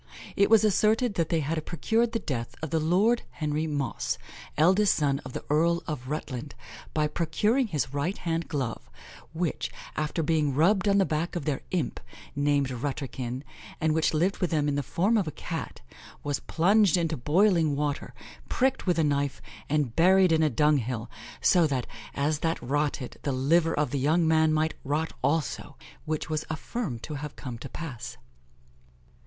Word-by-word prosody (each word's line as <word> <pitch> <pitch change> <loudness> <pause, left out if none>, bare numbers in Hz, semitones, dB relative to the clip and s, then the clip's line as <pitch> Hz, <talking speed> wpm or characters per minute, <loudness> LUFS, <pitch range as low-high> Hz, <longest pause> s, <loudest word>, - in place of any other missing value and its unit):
It 200 - +4
was 220 -1 +6
asserted 215 +2 +3
that 165 -4 0
they 165 -2 +1
had 155 +2 -2
procured 225 +8 0
the 230 - 0
death 120 - -4
of 160 - -3
the 165 - +2
Lord 195 +10 +3
Henry 155 0 -2
Mosse, 145 -3 -2 0.4
eldest 190 +6 +4
son 140 -3 +1
of 130 -3 -10
the - - -5
Earl 170 +3 +2
of 130 -5 -5
Rutland, 145 -2 -5 0.4
by 155 -1 +1
procuring 210 - +1
his 150 -7 -2
right 145 +7 -1
hand 165 -1 -2
glove, 120 - -3 0.4
which, 165 0 -2 0.3
after 155 +2 -1
being 150 -3 +1
rubbed 190 +6 +3
on 200 0 +4
the 195 - +4
back 160 +2 -2
of 165 -5 -3
their 145 -3 -1
imp, 170 -8 -2 0.4
named 145 -2 +1
"Rutterkin," 130 -1 -4 0.4
and 155 0 +2
which 160 0 +2
lived 175 +5 +1
with 180 - 0
them 150 -2 +1
in 145 - +1
the 145 - 0
form 195 - +1
of 190 - -1
a - - -2
Cat, - - -6 0.4
was 145 -1 -1
plunged 195 +2 +3
into 165 -2 0
boiling 160 - +3
water, 145 0 -2 0.3
pricked 265 -4 +1
with 175 -2 +2
a 160 - +3
knife, 140 -1 0 0.3
and 145 -6 0
buried 185 +1 +5
in 160 -1 +4
a 155 - +4
dung 150 +3 +3
hill, 120 -2 -4 0.3
so 175 -3 +5
that, 130 -4 -1 0.3
as 145 +1 0
that 165 +1 0
rotted, 145 0 -2
the 140 - -1
liver 160 +6 +2
of 150 0 0
the 140 - -1
young 160 +5 +3
man 160 0 +4
might 155 +1 +1
rot 150 +4 -1
also, 145 +3 -1 0.3
which 155 -1 -2
was 155 0 -2
affirmed 155 - -4
to 155 - -5
have 145 0 -6
come 125 -4 -7
to 135 - -8
pass. 140 -8 -7
155 Hz, 180 wpm, -27 LUFS, 145-175 Hz, 0.4 s, was